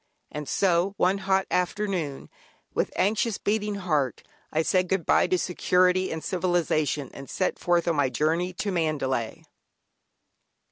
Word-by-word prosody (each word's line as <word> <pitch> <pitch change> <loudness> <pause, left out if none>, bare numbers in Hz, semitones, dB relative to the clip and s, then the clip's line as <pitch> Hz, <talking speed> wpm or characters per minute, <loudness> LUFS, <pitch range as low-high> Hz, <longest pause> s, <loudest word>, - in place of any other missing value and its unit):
And 150 -2 -6
so, 190 +1 +2
one 190 +2 +2
hot 190 0 +1
afternoon, 180 -6 -2 0.4
with - - 0
anxious 215 +2 +1
beating 210 0 -1
heart, 155 -9 -1 0.3
I 160 +1 +1
said 185 +2 +2
"Good 190 -4 0
bye" - - +4
to 185 - +2
security 180 +1 +2
and 160 -1 -4
civilisation, 165 -6 0
and 135 - -10
set 185 - -1
forth 175 -1 +1
on 165 -3 +1
my 140 -2 +2
journey 160 +7 0
to 200 +3 -3
Mandalay! 145 -9 -1
180 Hz, 140 wpm, -26 LUFS, 155-190 Hz, 0.4 s, bye